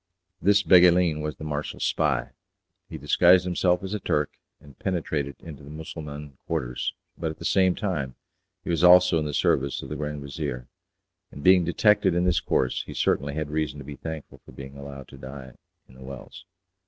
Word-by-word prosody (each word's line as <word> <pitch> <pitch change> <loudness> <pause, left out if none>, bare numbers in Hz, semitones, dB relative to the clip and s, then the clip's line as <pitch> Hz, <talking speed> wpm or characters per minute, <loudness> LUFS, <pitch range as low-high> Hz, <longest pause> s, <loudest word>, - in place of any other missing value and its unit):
This 100 +1 +4
Beguelin 90 -4 +5
was 75 0 -4
the - - -10
marshal's 75 -1 -4
spy. - - 0 0.6
He 80 - -6
disguised 85 +5 +5
himself 90 0 +1
as 95 +1 -4
a 105 - -2
Turk, 75 -5 0 0.3
and 70 -3 -17
penetrated 75 -6 -2
into 75 -4 -11
the 70 - -12
Mussulman 75 -2 -8
quarters, 60 0 -2 0.2
but 80 - -1
at 80 - -7
the - - -9
same 95 -2 +3
time 75 - -3 0.5
he - - -3
was 85 0 0
also 90 -1 +7
in 75 - -2
the 75 - -3
service 70 +1 +1
of - - -8
the - - -4
Grand 75 -1 -4
Vizier, 65 -2 -5 0.7
and 70 - -10
being 90 -1 +6
detected 95 +1 +3
in 90 - +2
this 90 -2 +2
course 65 -1 0
he - - -8
certainly 70 +1 0
had 75 -1 -3
reason 75 -2 -2
to 70 - -9
be 70 0 -7
thankful 80 +1 -8
for - - -15
being 70 0 -10
allowed 70 -2 -9
to - - -13
die 65 0 -9 0.4
in - - -19
The 65 - -16
Wells. 65 -1 -10
75 Hz, 190 wpm, -25 LUFS, 70-90 Hz, 0.7 s, also